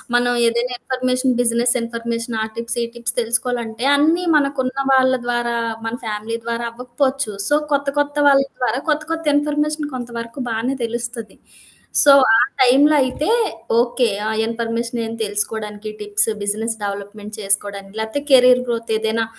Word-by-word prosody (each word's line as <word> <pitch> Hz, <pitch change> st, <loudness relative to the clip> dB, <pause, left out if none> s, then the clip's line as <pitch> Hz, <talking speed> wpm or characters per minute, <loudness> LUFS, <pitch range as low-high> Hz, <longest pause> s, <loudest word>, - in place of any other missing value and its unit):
మనం 245 Hz, 0 st, +3 dB, 0.2 s
ఏదైనా 235 Hz, +2 st, 0 dB
information, 255 Hz, 0 st, 0 dB
business 240 Hz, 0 st, +2 dB
information 230 Hz, 0 st, -4 dB
ఆ -, -, 0 dB
టిప్స్, 230 Hz, 0 st, -4 dB
ఈ -, -, +1 dB
టిప్స్ 240 Hz, +1 st, -3 dB
తెలుసుకోవాలంటే 235 Hz, -1 st, -2 dB
అన్నీ 325 Hz, +5 st, +2 dB
మనకున్న 275 Hz, -2 st, 0 dB, 0.2 s
వాళ్ళ 260 Hz, 0 st, +4 dB
ద్వారా, 240 Hz, -1 st, -1 dB, 0.3 s
మన 225 Hz, +1 st, -3 dB
ఫ్యామిలీ 220 Hz, +1 st, -3 dB
ద్వారా 235 Hz, 0 st, -3 dB
అవ్వకపోవచ్చు. 250 Hz, 0 st, -2 dB
సో, 295 Hz, -, +2 dB, 0.2 s
కొత్త 280 Hz, 0 st, +1 dB
కొత్త 290 Hz, 0 st, 0 dB
వాళ్ళ 275 Hz, -1 st, +6 dB, 0.2 s
ద్వారా 250 Hz, 0 st, 0 dB
కొత్త 305 Hz, 0 st, +1 dB
కొత్త 330 Hz, 0 st, -2 dB
ఇన్ఫర్మేషన్ 295 Hz, +1 st, 0 dB
కొంతవరకు 235 Hz, 0 st, -6 dB
బానే 230 Hz, +4 st, -1 dB
తెలుస్తది. 235 Hz, -1 st, -5 dB, 0.7 s
సో 285 Hz, -, +7 dB, 0.2 s
ఆ -, -, +4 dB, 0.2 s
టైంలో 280 Hz, +4 st, +5 dB
అయితే 260 Hz, +6 st, -2 dB, 0.5 s
ఓకే. 240 Hz, 0 st, +1 dB, 0.2 s
ఆ -, -, 0 dB, 0.2 s
ఇన్ఫర్మేషన్ 230 Hz, +1 st, -3 dB
ఏం 225 Hz, -, -5 dB
తెలుసుకోవడానికి 210 Hz, +1 st, -3 dB
టిప్స్, 210 Hz, +1 st, 0 dB
బిజినెస్ 220 Hz, +3 st, -2 dB
డెవలప్మెంట్ 205 Hz, +1 st, -6 dB
చేసుకోవడానికి 200 Hz, 0 st, -2 dB
లేతే 220 Hz, +6 st, -2 dB
కెరియర్ 250 Hz, -1 st, +6 dB
గ్రోత్ 230 Hz, -1 st, -3 dB
ఏదైనా 225 Hz, +1 st, 0 dB
235 Hz, 140 wpm, -20 LUFS, 225-260 Hz, 0.7 s, సో